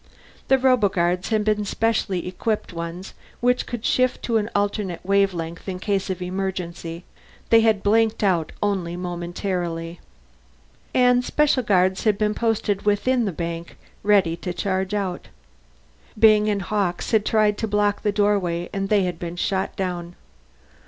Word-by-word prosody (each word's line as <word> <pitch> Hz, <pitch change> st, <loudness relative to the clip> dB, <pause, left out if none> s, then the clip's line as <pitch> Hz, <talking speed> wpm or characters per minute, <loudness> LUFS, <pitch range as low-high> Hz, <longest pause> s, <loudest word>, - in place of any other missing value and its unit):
The 265 Hz, -, +5 dB
roboguards 195 Hz, -9 st, +2 dB
had 215 Hz, -2 st, +1 dB
been 210 Hz, 0 st, +1 dB
specially 205 Hz, -4 st, -1 dB
equipped 210 Hz, +2 st, -2 dB
ones 170 Hz, +2 st, -6 dB, 0.3 s
which 250 Hz, +1 st, +1 dB
could 240 Hz, -1 st, -5 dB
shift 255 Hz, 0 st, +1 dB
to 230 Hz, -2 st, +1 dB
an 210 Hz, 0 st, -1 dB
alternate 200 Hz, -3 st, -1 dB
wavelength 190 Hz, -3 st, 0 dB
in 185 Hz, -, -3 dB
case 195 Hz, 0 st, -1 dB
of 185 Hz, -1 st, -3 dB
emergency; 180 Hz, -2 st, -4 dB, 0.5 s
they 225 Hz, 0 st, +7 dB
had 220 Hz, -3 st, +2 dB
blanked 220 Hz, +1 st, +2 dB
out 175 Hz, -5 st, +1 dB
only 185 Hz, -4 st, -1 dB
momentarily. 175 Hz, -1 st, -4 dB, 0.9 s
And 250 Hz, -1 st, +4 dB
special 295 Hz, -1 st, +2 dB
guards 190 Hz, -4 st, +2 dB
had 210 Hz, -2 st, +3 dB
been 210 Hz, 0 st, +1 dB
posted 215 Hz, -3 st, 0 dB
within 230 Hz, +4 st, +1 dB
the 200 Hz, -, -1 dB
bank, 170 Hz, 0 st, -5 dB, 0.2 s
ready 195 Hz, -5 st, +3 dB
to 180 Hz, 0 st, -4 dB
charge 190 Hz, +2 st, -1 dB
out. 190 Hz, -3 st, -3 dB, 0.9 s
Byng 215 Hz, -1 st, +5 dB
and 200 Hz, -2 st, -1 dB
Hawkes 195 Hz, -2 st, -1 dB
had 220 Hz, -3 st, +3 dB
tried 215 Hz, -1 st, +2 dB
to 220 Hz, -, -1 dB
block 205 Hz, -1 st, +1 dB
the 210 Hz, -, +1 dB
doorway 195 Hz, -4 st, 0 dB
and 195 Hz, 0 st, -2 dB
they 205 Hz, -2 st, +3 dB
had 175 Hz, -2 st, -3 dB
been 170 Hz, 0 st, -5 dB
shot 190 Hz, +2 st, -1 dB
down. 175 Hz, -2 st, -4 dB
195 Hz, 150 wpm, -23 LUFS, 180-215 Hz, 0.9 s, they